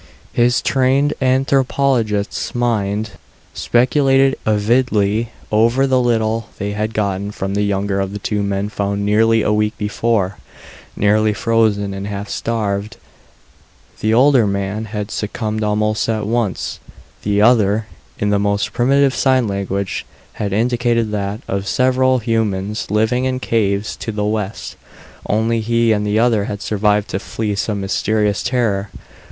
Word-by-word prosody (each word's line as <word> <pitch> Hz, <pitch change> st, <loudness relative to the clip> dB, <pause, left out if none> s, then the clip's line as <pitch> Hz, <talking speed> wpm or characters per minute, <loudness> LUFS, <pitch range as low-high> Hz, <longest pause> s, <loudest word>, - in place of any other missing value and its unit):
His 120 Hz, +1 st, +2 dB
trained 135 Hz, +2 st, +2 dB
anthropologist's 130 Hz, -5 st, +1 dB
mind 110 Hz, -3 st, -1 dB, 0.4 s
speculated 135 Hz, +2 st, +3 dB
avidly 110 Hz, 0 st, +1 dB, 0.2 s
over 115 Hz, +5 st, +3 dB
the 130 Hz, -1 st, +2 dB
little 115 Hz, -2 st, 0 dB
they 100 Hz, +1 st, -3 dB
had 105 Hz, +2 st, -3 dB
gotten 100 Hz, -1 st, -1 dB
from 95 Hz, -1 st, -4 dB
the 100 Hz, -, 0 dB
younger 100 Hz, -1 st, 0 dB
of 95 Hz, 0 st, -2 dB
the 105 Hz, -, -5 dB
two 105 Hz, 0 st, -2 dB
men 100 Hz, 0 st, -1 dB
found 100 Hz, -1 st, -2 dB
nearly 110 Hz, +2 st, +3 dB
a 105 Hz, -, +1 dB
week 105 Hz, +1 st, 0 dB
before, 105 Hz, -2 st, -1 dB, 0.6 s
nearly 105 Hz, +1 st, +2 dB
frozen 105 Hz, -3 st, +1 dB
and 95 Hz, +1 st, -5 dB
half 100 Hz, 0 st, -5 dB
starved. 105 Hz, -3 st, -2 dB, 1.0 s
The 110 Hz, -, 0 dB
older 125 Hz, -1 st, +5 dB
man 100 Hz, +2 st, -2 dB
had 105 Hz, -1 st, -5 dB
succumbed 110 Hz, +1 st, -3 dB
almost 105 Hz, +1 st, 0 dB
at 110 Hz, -2 st, -1 dB
once; 115 Hz, -2 st, -2 dB, 0.4 s
the 105 Hz, 0 st, 0 dB
other, 110 Hz, -1 st, +3 dB, 0.3 s
in 105 Hz, 0 st, 0 dB
the 100 Hz, -, +2 dB
most 100 Hz, 0 st, 0 dB
primitive 135 Hz, +2 st, +3 dB
sign 130 Hz, -1 st, +2 dB
language, 100 Hz, -1 st, -3 dB, 0.3 s
had 100 Hz, -1 st, -3 dB
indicated 115 Hz, +1 st, +1 dB
that, 105 Hz, +1 st, -3 dB
of 100 Hz, 0 st, -3 dB
several 130 Hz, +1 st, +2 dB
humans 105 Hz, -3 st, -1 dB
living 110 Hz, +4 st, +1 dB
in 130 Hz, 0 st, -1 dB
caves 105 Hz, -4 st, 0 dB
to 115 Hz, -, -4 dB
the 105 Hz, -1 st, -2 dB
west, 105 Hz, -1 st, -3 dB, 0.5 s
only 110 Hz, +2 st, +1 dB
he 115 Hz, +1 st, +1 dB
and 105 Hz, -1 st, 0 dB
the 105 Hz, +1 st, +1 dB
other 115 Hz, -3 st, +2 dB
had 105 Hz, -2 st, -5 dB
survived 105 Hz, +1 st, +1 dB
to 95 Hz, -, -2 dB
flee 105 Hz, +1 st, -3 dB
some 100 Hz, 0 st, -2 dB
mysterious 105 Hz, +1 st, 0 dB
terror. 105 Hz, -6 st, 0 dB
110 Hz, 140 wpm, -18 LUFS, 100-120 Hz, 1.0 s, older